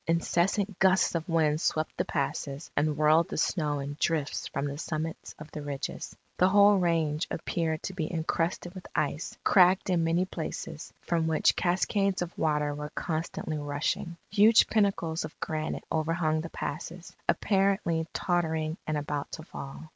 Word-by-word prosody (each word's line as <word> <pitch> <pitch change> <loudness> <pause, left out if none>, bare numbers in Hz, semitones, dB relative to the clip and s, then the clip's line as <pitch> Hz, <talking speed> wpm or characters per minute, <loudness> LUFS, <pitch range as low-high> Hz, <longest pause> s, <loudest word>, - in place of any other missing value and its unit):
Incessant 180 +4 +1
gusts 190 0 +4
of 165 0 -3
wind 155 -2 +2
swept 155 0 0
the - - -1
passes, 140 +1 -3
and 150 +1 +1
whirled 155 +2 +4
the - - -4
snow 150 -3 0
in 140 +1 -4
drifts 155 -4 0
from 140 -1 -3
the 140 0 -4
summits 160 0 -4
of 155 0 -11
the 150 - -6
ridges. 145 -2 -5 0.2
The 185 - +5
whole 205 0 +6
range 165 -2 +1
appeared 160 -1 -2
to 190 - -4
be 160 -4 -3
encrusted 170 +1 -1
with 185 -2 -9
ice, 150 +1 -1
cracked 185 0 +5
in 170 -2 +2
many 165 +3 +2
places, 160 -2 -6
from 165 -2 0
which 160 -1 +3
cascades 190 +1 +1
of 175 - -8
water 150 -2 +1
were 150 +1 -5
constantly 160 -1 -3
rushing. 145 +3 -2
Huge 215 +2 +6
pinnacles 195 -6 +1
of - - -8
granite 155 0 -3
overhung 160 0 +1
the 165 - -6
passes, 175 +1 -6
apparently 195 -5 +2
tottering 160 -2 0
and 155 -1 0
about 145 -1 -3
to 160 - -6
fall. 140 -3 -8
160 Hz, 160 wpm, -29 LUFS, 155-180 Hz, 0.2 s, whole